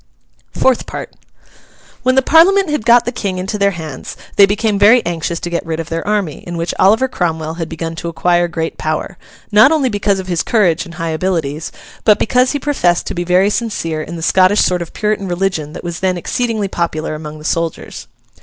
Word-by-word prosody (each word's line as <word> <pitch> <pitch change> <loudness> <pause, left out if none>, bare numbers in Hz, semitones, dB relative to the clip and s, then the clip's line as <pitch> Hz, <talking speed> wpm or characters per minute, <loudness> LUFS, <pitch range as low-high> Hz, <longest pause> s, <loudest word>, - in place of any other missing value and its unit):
FOURTH 260 -2 +1
PART - - -7 0.9
When 255 +1 +2
the 265 - +4
Parliament 350 +4 +5
had 275 -6 -2
got 235 0 +6
the 245 - -1
King 200 -7 -3
into 195 +3 -3
their 200 0 +4
hands, 155 -5 -7 0.2
they 200 - +7
became 210 0 0
very 225 +4 +5
anxious 170 0 -2
to 175 - -4
get 170 - -1
rid 165 -1 -4
of 165 0 -5
their 165 +2 -4
army, 205 -8 -1
in 175 -1 -7
which 170 +1 -2
Oliver 220 +7 +4
Cromwell 160 -6 -3
had 165 -1 -3
begun 165 0 -5
to 170 - -4
acquire 175 +1 +1
great 165 -1 -4
power; 155 0 -3 0.3
not 215 +7 +6
only 295 -5 +2
because 205 -2 0
of 190 - -5
his 175 -2 -1
courage 185 -8 +1
and 170 - -11
high 165 -1 -3
abilities, 160 -3 -2 0.3
but 210 -2 +5
because 250 +3 +2
he - - 0
professed 220 -12 +1
to - - -4
be 175 - -2
very 180 +3 +3
sincere 185 -9 -2
in 165 +2 -7
the 165 - -6
Scottish 185 +4 +4
sort 180 -1 +1
of 170 - -7
Puritan 210 -2 -1
religion 175 -4 -2
that - - -8
was 170 -1 -5
then 185 -1 0
exceedingly 220 +2 -2
popular 165 -4 -2
among 155 0 -7
the 150 - -12
soldiers. 165 0 -3
180 Hz, 210 wpm, -16 LUFS, 165-215 Hz, 0.9 s, they